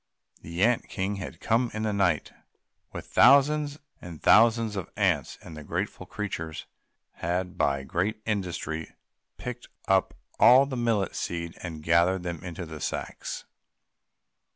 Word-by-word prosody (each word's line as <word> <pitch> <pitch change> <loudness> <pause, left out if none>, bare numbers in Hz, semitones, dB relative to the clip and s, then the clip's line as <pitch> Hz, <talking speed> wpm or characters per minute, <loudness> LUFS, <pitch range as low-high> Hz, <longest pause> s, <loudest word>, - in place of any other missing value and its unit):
The 85 +3 -2
ant 120 +1 +2
king 100 +2 -2
had 95 - -7
come 115 +2 +1
in 110 - -2
the 110 -1 0
night 90 -6 +1 0.6
with - - -7
thousands 145 +1 +4 0.2
and 85 -3 -9
thousands 115 -1 +5
of 95 - -4
ants, 90 -10 +1
and 80 - -10
the 75 - -8
grateful - - -4
creatures 80 -7 -5 0.5
had 90 +1 -2
by 70 -1 +1
great 100 +10 -1
industry 90 -6 -3 0.4
picked 125 0 -7 0.2
up 95 -1 +2 0.2
all 130 +3 +8
the 135 -1 -5
millet 115 -5 0
seed 85 -1 -4
and 80 -4 -7
gathered 85 +3 +3
them 85 -2 -5
into 85 -1 -6
the 80 -1 -8
sacks. - - -4
95 Hz, 140 wpm, -27 LUFS, 85-115 Hz, 0.6 s, all